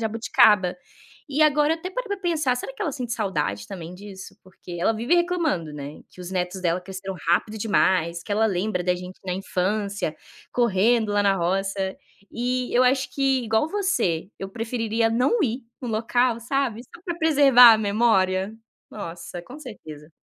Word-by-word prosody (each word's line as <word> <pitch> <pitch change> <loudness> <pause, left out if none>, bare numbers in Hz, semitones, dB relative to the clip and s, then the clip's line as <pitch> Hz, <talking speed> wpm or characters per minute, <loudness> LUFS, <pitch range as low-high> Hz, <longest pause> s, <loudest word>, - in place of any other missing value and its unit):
jabuticaba. 220 -4 +3 0.5
E 285 +2 -2
agora 300 +1 +4
até 330 +3 -6
parei - - -4
para 405 -1 -3
pensar, 315 -8 +1
"será 260 - -5
que - - -5
ela 320 - -1
sente 250 -3 -4
saudade 190 - -2
também 175 -2 -8
disso?", 190 0 -11
porque 185 -1 -13
ela 205 - +3
vive 235 +9 +1
reclamando, 340 - 0
né, 145 0 -8
que 180 - -15
os 180 - -7
netos 180 +1 -2
dela 175 0 0
cresceram 190 +1 -7
rápido 210 +5 +1
demais, 185 -5 +1
que 210 - -4
ela 215 +2 +2
lembra 185 -1 -1
da 180 - +2
gente 180 +1 -9
na 185 - -2
infância, 200 +2 -2 0.4
correndo 225 -1 +2
lá 205 0 +2
na 200 -1 +3
roça, 190 +2 -1 0.3
e 250 +1 -2
eu 245 - +5
acho 260 +1 +2
que 270 -2 +1
igual 225 +6 +1
você, 245 - -1
eu 195 - -5
preferiria 225 +1 -1
não 255 - +2
ir 250 0 -1 0.2
no 250 - -5
local, 235 +2 +1
sabe, 240 -2 -1
só 335 - -16
para 345 -2 -3
preservar 275 -7 +7
a - - 0
memória. 200 -3 +2 0.4
Nossa, 175 -2 -7
com 255 +11 -11
certeza. 160 - -11
220 Hz, 170 wpm, -24 LUFS, 185-250 Hz, 0.5 s, preservar